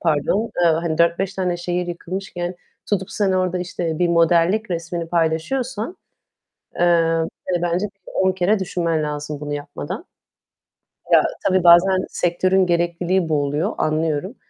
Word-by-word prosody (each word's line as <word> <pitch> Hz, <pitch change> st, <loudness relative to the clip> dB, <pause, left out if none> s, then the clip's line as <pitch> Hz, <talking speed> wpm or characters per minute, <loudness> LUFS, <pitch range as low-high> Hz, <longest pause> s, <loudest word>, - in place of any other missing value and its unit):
pardon, 160 Hz, +5 st, +1 dB, 0.2 s
eee, 170 Hz, -, +5 dB
hani 160 Hz, 0 st, -1 dB
4-5 170 Hz, +3 st, +2 dB
tane 180 Hz, -2 st, -1 dB
şehir 175 Hz, 0 st, -2 dB
yıkılmışken 175 Hz, 0 st, -5 dB, 0.3 s
tutup 190 Hz, -3 st, -1 dB
sen 200 Hz, -3 st, 0 dB
orada 185 Hz, -1 st, 0 dB
işte 175 Hz, -3 st, -3 dB
bir 175 Hz, -, +2 dB
modellik 170 Hz, +5 st, +3 dB
resmini 170 Hz, 0 st, -3 dB
paylaşıyorsan, 205 Hz, -, -1 dB, 0.8 s
eee, -, -, -5 dB, 0.7 s
hani 175 Hz, -1 st, 0 dB
bence 175 Hz, +4 st, 0 dB
bir 200 Hz, -1 st, -15 dB
10 190 Hz, 0 st, +2 dB
kere 190 Hz, +3 st, +1 dB
düşünmen 170 Hz, -4 st, -1 dB
lazım 150 Hz, 0 st, -4 dB
bunu 145 Hz, 0 st, -4 dB
yapmadan. 145 Hz, -, -6 dB, 1.1 s
Ya, -, -, +7 dB, 0.2 s
tabii 185 Hz, -2 st, +2 dB
bazen 185 Hz, +2 st, +6 dB
sektörün 185 Hz, +2 st, +1 dB
gerekliliği 175 Hz, 0 st, 0 dB
bu 150 Hz, -2 st, +2 dB
oluyor, 150 Hz, +9 st, -1 dB
anlıyorum 155 Hz, -, -1 dB
175 Hz, 135 wpm, -21 LUFS, 165-190 Hz, 1.1 s, Ya